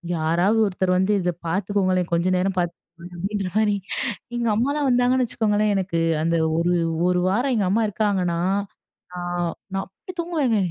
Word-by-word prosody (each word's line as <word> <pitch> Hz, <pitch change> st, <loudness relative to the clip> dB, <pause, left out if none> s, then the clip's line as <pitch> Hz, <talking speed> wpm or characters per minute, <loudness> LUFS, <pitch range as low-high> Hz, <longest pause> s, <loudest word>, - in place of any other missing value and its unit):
"யாராவது 170 Hz, +7 st, +2 dB
ஒருத்தர் 185 Hz, -2 st, 0 dB
வந்து 190 Hz, +3 st, +2 dB
இதை 180 Hz, 0 st, 0 dB
பாத்துக்கோங்களேன், 185 Hz, 0 st, 0 dB
கொஞ்ச 170 Hz, +2 st, +2 dB
நேரம் 190 Hz, +1 st, 0 dB
பாத்துக்கோங்க." 175 Hz, 0 st, -6 dB
அப்படின்ற 195 Hz, +2 st, -2 dB
மாதிரி, 215 Hz, -2 st, +3 dB, 0.6 s
எங்க 235 Hz, -1 st, 0 dB
அம்மாலாம் 280 Hz, +6 st, +1 dB
வந்தாங்கன்னு 250 Hz, +1 st, +3 dB
வச்சுக்கோங்களேன், 210 Hz, -2 st, +1 dB
எனக்கு 185 Hz, -3 st, -1 dB, 0.2 s
அந்த 165 Hz, +1 st, +1 dB, 0.2 s
ஒரு 175 Hz, +1 st, +2 dB, 0.4 s
1 180 Hz, 0 st, +2 dB
வாரம் 245 Hz, +7 st, +1 dB
எங்க 210 Hz, -4 st, +1 dB
அம்மா 225 Hz, +2 st, +2 dB
இருக்காங்கன்னா, 190 Hz, -5 st, 0 dB, 0.7 s
நான் 175 Hz, -1 st, -2 dB, 0.2 s
நான் 195 Hz, -, -1 dB
அப்படி 365 Hz, -, -12 dB
தூங்குவேங்க. 305 Hz, -10 st, 0 dB
195 Hz, 145 wpm, -23 LUFS, 175-220 Hz, 0.7 s, மாதிரி